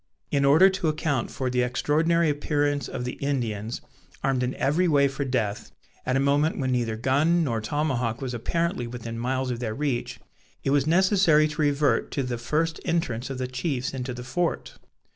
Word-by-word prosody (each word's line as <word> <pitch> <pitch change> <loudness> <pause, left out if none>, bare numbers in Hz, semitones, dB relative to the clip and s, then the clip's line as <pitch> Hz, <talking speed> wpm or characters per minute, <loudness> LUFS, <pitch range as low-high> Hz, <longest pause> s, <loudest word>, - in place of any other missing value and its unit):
In 140 -1 +2
order 155 +7 +7
to 190 -3 -1
account 150 -4 -1
for 130 -2 -3
the 125 0 +1
extraordinary 160 +7 +2
appearance 145 -1 0
of 125 - -5
the 125 - -5
Indians, 115 -6 -2 0.4
armed 135 -1 +1
in 125 +1 -1
every 165 +7 +1
way 140 -3 +4
for 135 +1 -3
death, 115 -5 -2 0.4
at 125 - +1
a - - +3
moment 145 +3 +2
when 130 -1 -1
neither 120 -3 0
gun 145 +9 +2
nor 115 -7 -1
tomahawk 125 -2 -1
was 130 -2 -4
apparently 165 +2 -1
within 115 -1 -6
miles 130 +1 -1
of 120 - -3
their 110 -3 -3
reach, 135 -3 -2 0.4
it 135 - 0
was 140 0 +2
necessary 175 -3 +4
to 150 +1 -3
revert 145 0 +2
to 140 - -1
the 125 -2 -3
first 160 +7 -1
entrance 130 -8 -1
of 135 - -4
the 130 - -2
chiefs 130 +1 -3
into 130 -1 -4
the 125 0 -6
fort. 165 +7 -2
135 Hz, 185 wpm, -25 LUFS, 125-150 Hz, 0.4 s, order